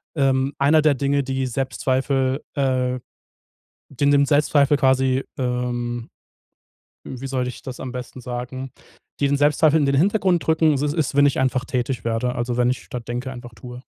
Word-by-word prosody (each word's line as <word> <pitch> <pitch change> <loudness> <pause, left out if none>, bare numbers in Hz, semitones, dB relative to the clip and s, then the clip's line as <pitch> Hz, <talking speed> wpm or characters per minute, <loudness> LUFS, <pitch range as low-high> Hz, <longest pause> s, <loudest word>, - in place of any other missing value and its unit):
Ähm, 135 -1 +1
einer 150 +3 +4
der 150 -2 +5
Dinge, 140 +1 0
die 130 0 -2
Selbstzweifel 130 +1 -1
äh 130 -2 0 0.9
die 140 +1 -2
nimmt 140 -1 +4
Selbstzweifel 145 -1 +3
quasi, 130 -1 +2 0.2
ähm 120 -1 -2 1.0
wie 130 +1 -7
soll 130 -2 -1
ich 125 - -8
das 130 -1 -7
am 130 -1 -5
besten 125 0 -7
sagen 125 +2 -6 0.5
die 140 - +3
den 145 - +2
Selbstzweifel 150 +2 +3
in 145 - +2
den 140 - +1
Hintergrund 185 0 +2
drücken, 160 -2 +3
so 145 - -1
es 145 - -2
ist, 155 -4 -1
wenn 145 0 +6
ich 140 - +1
einfach 130 -1 +1
tätig 125 -1 -2
werde, 115 +2 -1
also 120 0 -2
wenn 125 0 +2
ich 130 - -3
statt 120 -2 -7
denke, 125 +2 -3
einfach 120 -1 -10
tue. 125 +3 -10
130 Hz, 175 wpm, -22 LUFS, 125-140 Hz, 1.0 s, wenn